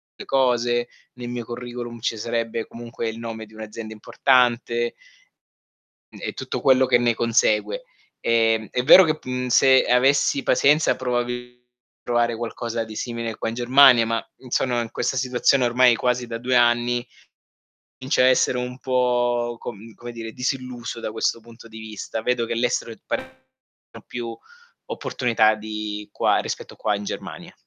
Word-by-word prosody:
le - - -10
cose, 120 -2 +1 0.3
ne 125 -1 -9
mio 120 -1 -4
curriculum 120 -1 -7
ci 115 - -2
sarebbe 115 0 -3
comunque 115 -1 -6
il 110 - -7
nome 115 -1 -6
di 110 - -18
un'azienda 110 0 -8
importante 120 +1 +1 1.2
n - - -12
e - - -4
tutto - - -5
quello 130 -1 +5
che 125 -1 +4
ne 120 -1 +2
consegue. 115 - +1 0.4
Ehm, 115 -1 +2
è 125 - -1
vero 185 +7 +9
che 155 -2 0
pu 130 - -11
mhmm, 125 0 -2
se 130 +1 +5
avessi 135 +2 +3
pazienza, 150 +4 +3
probabi 125 0 -3 0.4
provare 120 -1 +1
qualcosa 115 0 -4
di 110 -1 -10
simile 115 -2 -4
qua - - -3
in 115 - -6
Germania 125 -1 +6
ma, 115 0 -2
mhmm, 130 - -14
sonoin 120 -2 0
questa 130 - -2
situazione 125 +1 +2
ormai 120 0 +4
quasi 125 0 -1
da 115 -1 -4
2 125 +2 -1
anni, 120 0 +2 0.9
comincio 130 +1 0
a 125 - +6
essere 130 -1 +3
un 125 +1 -5
po', 120 -2 0
com 110 0 -9
come 120 0 -9
dire, 115 -1 -7
disilluso 125 -2 -4
da - - -4
questo 110 +1 -1
punto 115 0 -15
di 110 0 -11
vista. 110 0 -6
Vedo 120 0 0
che 115 - -3
l'estero 115 -1 -1
è - - -10
pa - - -1 0.6
no, - - -16
più 115 -1 -6 0.5
opportunità 110 -3 +1
di 105 -1 -6
qua - - +2
rispetto - - -5
qua 105 - 0
in 100 - -6
Germania. - - -7
120 Hz, 165 wpm, -23 LUFS, 115-125 Hz, 1.2 s, vero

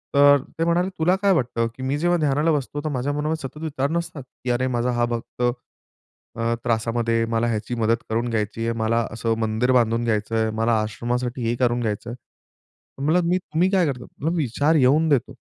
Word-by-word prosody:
तर 145 0 +7 0.2
ते - - +2
म्हणाले, 175 +2 +2
"तुला 180 +4 +3
काय 200 -1 +4
वाटतं 120 -5 0
की 130 - -8
मी 135 +2 0
जेव्हा 175 +3 +2
ध्यानाला 150 +2 +2
बसतो 145 0 -2
तर 155 - -1
माझ्या 140 0 -1
मनामध्ये 150 0 -2
सतत 150 +3 -13
विचार 145 -3 -1
नसतात 170 -4 -3 0.2
की 125 - -3
अरे 125 +2 +1
माझा 125 +1 0
हा 120 0 +1
भक्त 115 - -8 0.9
अ, 115 +1 0
त्रासामध्ये 115 0 0
मला 115 +1 +1
ह्याची 115 +1 -2
मदत 115 0 +2
करून 115 +2 0
घ्यायची 110 -1 -2
आहे, 115 - +1
मला 110 +1 +1
असं 115 +1 -1
मंदिर 110 +3 +1
बांधून 115 -1 +2
घ्यायचंय, 110 0 0
मला 115 +1 +2
आश्रमासाठी 120 +4 -3
हे 115 +1 0
करून 120 -1 +1
घ्यायचंय. 110 +1 -3 0.8
म्हणलं 160 +5 +1 0.3
मी 185 - +4
काय 190 -3 +3
करतो? 125 -5 -3 0.3
विचार 145 +1 +1
येऊन 150 +3 +4
देतो. 135 -5 +1
125 Hz, 180 wpm, -23 LUFS, 115-150 Hz, 0.9 s, तर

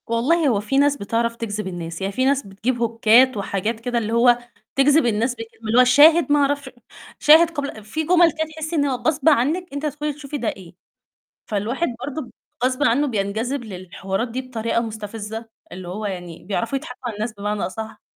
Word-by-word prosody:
والله 275 +8 +2
هو 225 -6 +2
في 210 +6 -1
ناس 285 0 +3
بتعرف 230 +1 -1
تجذب 215 -3 -4
الناس، 170 -1 -6
يعني 195 +1 -2
في 255 +5 +1
ناس 275 -4 +1
بتجيب 220 +6 -2
هوكات 230 +2 +4
وحاجات 200 +3 -2
كده 245 +1 -2
اللي 225 -1 -1
هو 240 +1 +5 0.4
تجذب 280 +1 +4
الناس 235 +2 0
ب - - -36 0.3
اللي 235 +3 +4
هو - - +9
شاهد 295 +6 +6
ما 295 - +5
أعرفش 280 -1 0 0.5
شاهد 320 +3 +7
قبل 285 -9 -5
في 310 +10 -3
جمل 345 +1 +5
كده 315 +1 -3
تحسّي 315 +1 -4
إن 290 -2 +2
هو 270 -2 0
غصب 300 +3 +2
عنِك 305 +6 +2
أنتِ 285 +2 -4
هتدخلي 295 0 -2
تشوفي 290 0 -6
ده 245 - -3
إيه، 185 -3 -10 0.7
فالواحد 225 +11 -1 0.2
برضه 290 +2 -4
ب 250 - -12 0.3
غصبٍ 255 +2 0
عنه 290 +1 +3
بينجذب 230 +3 -2
للحوارات 195 +2 -4
دي 245 +3 -4
بطريقة 230 -3 -2
مستفزة، 220 0 -6 0.2
اللي 180 -1 -8
هو 210 +4 -4
يعني 180 -4 -7
بيعرفوا 230 +7 -1
يضحكوا 265 -3 -10
على 225 - -5
الناس 215 +3 -3
بمعنى 205 0 -3
أصح، 220 +4 -7
235 Hz, 190 wpm, -22 LUFS, 210-285 Hz, 0.7 s, هو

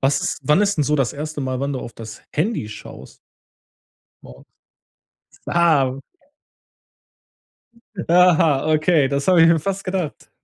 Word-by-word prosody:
Was 135 +1 +1
ist - - -2
wann 150 +8 +3
ist 200 -5 0
'n - - +3
so 150 +2 +1
das 135 -4 0
erste 150 0 -6
Mal, 130 0 -3
wann 140 0 -2
du 130 - -4
auf 120 - -9
das 110 -1 -11
Handy 170 - -1
schaust? 105 - -12 1.0
Morgens? 60 - -15 1.0
Ah. 140 -6 +2 2.1
Aha, 165 -5 +4
okay, 155 -3 +2
das 140 0 -2
habe 180 -3 +5
ich 165 - +6
mir 165 -1 +4
fast 195 +4 -4
gedacht. 185 -5 -4
150 Hz, 145 wpm, -20 LUFS, 135-170 Hz, 2.1 s, ich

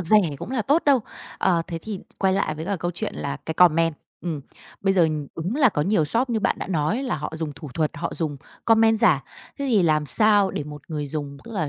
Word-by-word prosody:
rẻ 180 +5 +4 0.2
cũng 220 - -7
là 255 -4 0
tốt 290 +9 +3
đâu. 275 -3 +5 0.4
Ờ, 170 -3 +2
thế 165 -1 -4
thì 210 -3 -5 0.2
quay 190 -1 +2
lại 155 -5 0
với 160 +1 -6
cả 200 +1 -1
câu 175 0 -2
chuyện 175 - -4
là 70 -1 -3
cái 160 - -2
comment, 165 -2 +4 0.3
ừm, 160 -5 -3 0.4
bây 195 0 +2
giờ 170 -4 +4 0.3
đúng 180 - -2
là 270 -5 +6
có 150 - 0
nhiều 185 -2 +2
shop 240 - 0
như 220 -2 0
bạn - - +1
đã - - -4
nói, 180 - 0
là 260 - -1
họ - - -5
dùng 155 -2 -3
thủ 145 +1 -9
thuật, 155 -2 +1
họ 170 - -3
dùng 155 -4 -2 0.3
comment 225 -1 +4
giả. 180 - +4 0.4
Thế 280 - -2
thì 215 -6 +4
làm 155 -3 +2
sao 205 -1 +4
để 145 - -4
một 150 -1 -9
người 150 -2 -3
dùng, 140 -1 -5
tức 230 - -10
là 160 -8 -1
175 Hz, 245 wpm, -24 LUFS, 155-215 Hz, 0.4 s, là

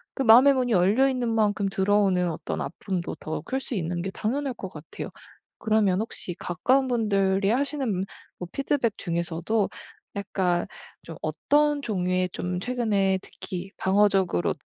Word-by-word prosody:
그 270 - 0
마음의 255 +4 +8
문이 250 -2 0
열려 205 +8 +4
있는 250 -3 -1
만큼 210 -3 +1
들어오는 190 -3 +2
어떤 - - -4
아픔도 185 -3 -4
더 155 - -5
클 265 - -3
수 260 - -5
있는 175 -2 -2
게 190 - -3
당연할 255 +6 -2
것 190 - -6
같아요. 155 -2 -8 0.5
그러면 215 -3 +2
혹시 220 -5 -5
가까운 260 +10 +1
분들이 200 -4 +1
하시는 280 +3 0
음 190 -2 -1 0.3
뭐 180 - -6
피드백 270 -5 0
중에서도 170 +4 -1 0.5
약간 185 -3 0 0.4
좀 165 - -9
어떤 290 - +1
종류의 185 -5 0
좀 180 0 -3
최근에 205 -5 +1
특히 190 +1 -7
방어적으로 195 - +2
200 Hz, 310 characters per minute, -26 LUFS, 180-240 Hz, 0.5 s, 마음의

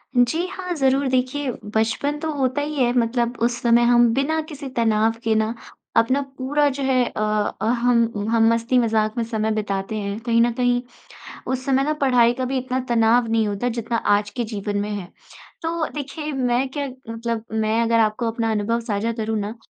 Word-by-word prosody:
जी 245 +8 +2
हाँ, 365 -1 -5
ज़रूर। 270 -1 +2
देखिए 260 +2 0 0.3
बचपन 230 +7 0
तो 320 0 -2
होता 265 0 0
ही 300 +1 -3
है, 240 - +2
मतलब 235 +1 0
उस 240 0 0
समय 235 0 +4
हम 240 0 +5
बिना 280 +5 0
किसी 290 -2 -7
तनाव 225 -1 +2
के 225 - +2
ना, 220 +1 +1 0.4
अपना 260 +5 +3 0.2
पूरा 290 +3 +1
जो 275 0 -4
है 260 -2 +3
अ 215 - -4 0.4
अ, - - 0
हम, 235 -3 +1
हम 225 -1 +4
मस्ती-मज़ाक 230 -2 +1
में 235 - +1
समय 220 -1 -1
बिताते 200 -1 -2
हैं। 200 0 -3
कहीं 230 -1 +3
न 240 +1 +3
कहीं, 245 0 +1 0.7
उस 260 0 -2
समय 270 0 +3
ना 305 - +1
पढ़ाई 245 -3 +4
का 255 +1 -2
भी 260 +1 -1
इतना 255 0 -2
तनाव 235 0 +3
नहीं 225 -1 +2
होता 205 +4 -1
जितना 230 +1 -1 0.2
आज 205 0 -3
के 240 +1 -3
जीवन 205 -2 -3
में 205 +1 -3
है। 200 -3 -4 0.6
तो 330 -1 -1
देखिए 300 +1 -5
मैं 255 -1 0
क्या 285 +1 -3 0.2
मतलब 230 0 -3
मैं 220 +1 +1
अगर 230 0 +2
आपको 220 +2 +1
अपना 225 0 -1
अनुभव 220 +2 0
साझा 225 0 -2
करूँ 220 -1 -2
ना, 210 +2 -4
235 Hz, 190 wpm, -22 LUFS, 220-260 Hz, 0.7 s, हम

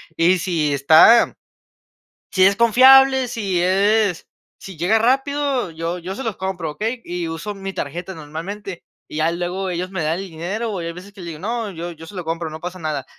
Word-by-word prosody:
y 180 +2 +3
si 160 -5 0
está 160 - +6 0.9
si 185 0 +4
es 200 0 +3
confiable, 260 +3 +6
si 200 -7 -2
es, 200 0 +2 0.3
si 190 -4 -11
llega 185 +7 +3
rápido, 270 -1 0
yo 165 +2 -4
yo 180 +3 -6
se 265 - -6
los 220 -4 -3
compro", 190 -4 -3
¿okey?, 225 +8 -3
y 175 -1 -4
uso 165 +6 -5
mi 195 -1 -7
tarjeta 175 +4 -5
normalmente. 175 +5 -7 0.2
Y - - -9
ya 155 +2 +2
luego 180 +2 -3
ellos 180 +1 -3
me 185 -3 -3
dan 160 +3 -1
el 195 -2 -8
dinero, 195 +8 -4
o 195 - -3
hay 170 -1 -4
veces 185 +4 -12
que 195 - -14
le 175 - -8
digo: 165 -3 -7
"No, 225 +1 -3
yo 170 +1 -6
yo 165 -1 -11
se 205 - -12
lo 180 -3 -5
compro 165 0 -3
no 155 +1 -8
pasa 180 +1 -6
nada". 155 -5 -3
185 Hz, 205 wpm, -20 LUFS, 165-210 Hz, 0.9 s, está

